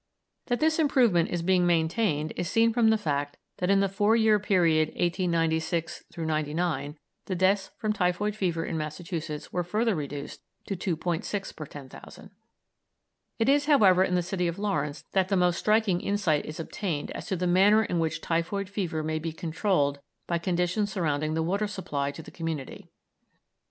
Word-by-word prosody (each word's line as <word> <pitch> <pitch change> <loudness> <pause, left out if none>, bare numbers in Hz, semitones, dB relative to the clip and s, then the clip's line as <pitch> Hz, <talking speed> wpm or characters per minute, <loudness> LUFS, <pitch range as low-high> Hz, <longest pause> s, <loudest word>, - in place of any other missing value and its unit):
That 245 -1 0
this 315 +1 +2
improvement 240 - +3
is 175 -1 -2
being 180 0 +3
maintained 160 -2 +1
is 175 - -3
seen 230 +2 +3
from 230 -1 +4
the 220 - +4
fact 145 -6 -2 0.2
that 180 - 0
in 195 0 +4
the 195 - +3
four 205 +3 +2
year 220 -2 +4
period 170 -6 +3
1896 165 -2 0
99 155 -1 -2 0.3
the 185 - -2
deaths 190 +2 +2
from 215 -1 -1
typhoid 200 +2 0
fever 175 -5 -1
in 160 - -3
Massachusetts 155 0 -5
were 180 - 0
further 215 +6 0
reduced 145 -3 -5 0.2
to 195 - -3
2·6 180 +2 -3
per 155 - -7
10,000. 140 -3 -12 1.1
It 225 - +1
is, 285 +1 +3
however, 195 -11 +6
in 180 -1 0
the 180 - +1
city 180 0 -1
of 170 +1 -3
Lawrence 150 -8 -2
that 190 -1 +2
the 195 0 +1
most 180 -1 +2
striking 210 -4 +2
insight 190 -8 0
is 155 - -7
obtained 165 -2 -3
as - - -7
to 195 - -1
the 180 0 -2
manner 195 +5 +5
in 175 -5 -1
which 160 -1 -1
typhoid 180 +4 -1
fever 175 -6 -2
may 155 0 -1
be 165 +1 -4
controlled 160 -3 0 0.3
by 170 -1 -1
conditions 180 +4 0
surrounding 155 -4 -1
the 160 - 0
water 200 +5 0
supply 155 -8 -3
to 160 +3 -8
the - - -12
community. 160 -5 -5
175 Hz, 170 wpm, -27 LUFS, 160-200 Hz, 1.1 s, however